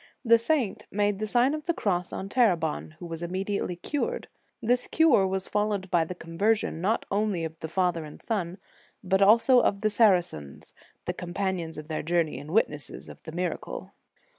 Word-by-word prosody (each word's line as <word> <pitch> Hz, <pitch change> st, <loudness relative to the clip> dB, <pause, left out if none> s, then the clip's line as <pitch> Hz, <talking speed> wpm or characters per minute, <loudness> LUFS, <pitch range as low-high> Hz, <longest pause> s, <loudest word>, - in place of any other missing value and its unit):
The 230 Hz, 0 st, +6 dB
saint 245 Hz, -4 st, 0 dB
made 205 Hz, 0 st, 0 dB
the 215 Hz, -, -2 dB
Sign 245 Hz, +5 st, +3 dB
of 305 Hz, 0 st, -5 dB
the 340 Hz, -, 0 dB
Cross 180 Hz, -3 st, -1 dB
on 190 Hz, -, -5 dB
Terebon, 175 Hz, -, +1 dB
who 175 Hz, -, -9 dB
was 165 Hz, -1 st, -6 dB
immediately 185 Hz, +1 st, -2 dB
cured. 295 Hz, -, -3 dB, 0.3 s
This 245 Hz, +2 st, +1 dB
cure 310 Hz, -12 st, +4 dB
was 190 Hz, 0 st, -2 dB
fol 210 Hz, 0 st, +1 dB
lowed 195 Hz, -3 st, -3 dB
by 170 Hz, -2 st, +3 dB
the 180 Hz, -, -6 dB
conversion, 180 Hz, +1 st, 0 dB
not 215 Hz, +5 st, 0 dB
only 200 Hz, -4 st, 0 dB
of 160 Hz, 0 st, -6 dB
the 160 Hz, -, -5 dB
father 175 Hz, -1 st, 0 dB
and 150 Hz, -1 st, -10 dB
son, 185 Hz, -5 st, -3 dB, 0.5 s
but 190 Hz, +1 st, +1 dB
also 230 Hz, +5 st, +6 dB
of 200 Hz, -3 st, +1 dB
the 215 Hz, -1 st, +2 dB
Saracens, 180 Hz, -, +1 dB, 0.3 s
the -, -, -1 dB
companions 180 Hz, -2 st, -3 dB
of 150 Hz, 0 st, -8 dB
their 155 Hz, -1 st, -2 dB
journey 165 Hz, -4 st, 0 dB
and 145 Hz, +2 st, -10 dB
witnesses 150 Hz, -6 st, -1 dB
of -, -, -12 dB
the 160 Hz, -, -9 dB
miracle. 180 Hz, +2 st, -4 dB
190 Hz, 185 wpm, -27 LUFS, 170-215 Hz, 0.5 s, The